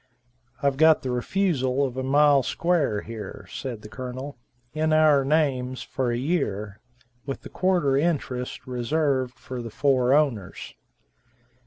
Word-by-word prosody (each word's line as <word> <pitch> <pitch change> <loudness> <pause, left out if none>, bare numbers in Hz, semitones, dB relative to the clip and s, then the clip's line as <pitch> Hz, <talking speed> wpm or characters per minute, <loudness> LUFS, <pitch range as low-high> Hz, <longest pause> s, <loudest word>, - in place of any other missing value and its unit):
"I've 140 -1 +2
got 160 +1 +5
the 130 - -2
refusal 135 -1 0
of 130 -2 -5
a 130 - -2
mile 140 +1 +4
square 150 -8 0
here," 110 -3 -8
said 120 -5 -6
the - - -8
Colonel, 130 +4 -7 0.4
"in 155 0 +1
our 155 -3 +5
names, 135 -4 0
for 130 -2 -2
a 120 - -1
year, 105 - -2 0.5
with 135 - -5
a - - -7
quarter 175 -7 +1
interest 135 -6 -1
reserved 130 0 -1
for 130 -1 -7
the 115 - -6
four 130 +1 +2
owners." 120 -11 -1
135 Hz, 140 wpm, -25 LUFS, 125-150 Hz, 0.5 s, got